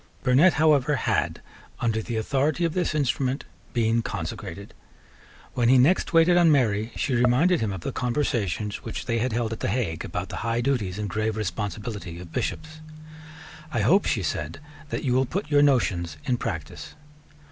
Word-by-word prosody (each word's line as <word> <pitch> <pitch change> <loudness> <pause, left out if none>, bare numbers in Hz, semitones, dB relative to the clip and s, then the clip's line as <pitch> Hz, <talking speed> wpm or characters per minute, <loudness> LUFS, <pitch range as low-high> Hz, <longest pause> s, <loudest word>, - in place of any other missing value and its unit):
Burnet 135 +8 +5
however 150 -2 +3
had, - - -1 0.4
under 115 -2 0
the 115 +2 -5
authority 140 +8 0
of 165 - -1
this 175 -3 -1
instrument, 135 -2 0 0.3
been 115 -1 +1
consecrated. - - -6 0.8
When 120 -1 +2
he 130 - +6
next 145 +9 +3
waited 165 +1 +5
on 170 -2 +5
Mary, 110 -5 +2
she 135 - -1
reminded 125 +9 +3
him 110 -2 0
of 95 -3 -5
the - - -3
conversations 115 - -1
which 115 - -6
they 115 -2 0
had 125 +2 0
held 115 0 -1
at 110 - -7
the - - -2
Hague 95 -7 -1
about 90 +1 -4
the - - -5
high 115 +1 -1
duties 115 -8 -1
and 105 -1 -3
grave 110 +2 -2
responsibility 100 -3 -4
of 85 -2 -11
Bishops. 155 0 -4 0.9
"I - - 0
hope," 195 +4 +4
she 105 - 0
said, 80 - -3 0.3
"that - - -3
you 125 - +1
will 130 +1 +2
put 170 +2 -4
your 145 0 +5
notions 95 - +1
in 125 - +1
practice." 80 -9 -6
120 Hz, 175 wpm, -25 LUFS, 105-145 Hz, 0.9 s, he